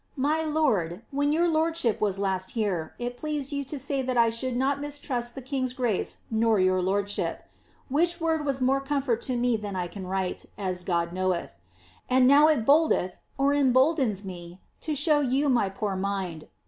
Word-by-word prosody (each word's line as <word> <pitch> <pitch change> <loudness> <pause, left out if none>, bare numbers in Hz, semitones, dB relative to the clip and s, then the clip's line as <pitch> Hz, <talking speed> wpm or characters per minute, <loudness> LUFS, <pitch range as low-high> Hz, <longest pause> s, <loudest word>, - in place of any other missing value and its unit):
My 295 +4 +1
lord, 235 - 0
when 285 +1 +1
your 335 +3 +2
lordship 320 -7 +1
was 200 -3 +1
last 190 -1 -1
here, 185 -8 -1
it 245 0 -5
pleased 300 -2 -3
you 280 -1 -2
to 290 +3 -5
say 275 0 -2
that 255 -1 -2
I 230 -1 +4
should 245 +2 -2
not 275 +2 0
mistrust 265 -5 -4
the 270 - -7
king's 255 -1 -2
grace 245 -6 -2
nor 220 -1 +2
your 185 0 +3
lordship. 200 +2 -1 0.4
Which 340 +5 +1
word 325 -2 0
was 275 -2 -1
more 270 +2 +2
comfort 275 -4 -1
to 255 - 0
me 240 -1 +1
than 205 -2 -6
I 180 -1 -1
can 185 +1 -8
write, 190 -1 -3
as 185 -3 -3
God 170 -1 -1
knoweth. 185 - -1 0.6
And 255 0 +4
now 290 +3 +7
it 290 -8 +2
boldeth 280 - +3 0.2
^emboldens) 270 - +2
me 175 -1 -8 0.2
to 310 -1 -3
show 295 +1 +3
you 280 +1 +1
my 235 -6 +2
poor 195 0 -3
mind. 190 -4 -3
245 Hz, 180 wpm, -27 LUFS, 195-285 Hz, 0.6 s, now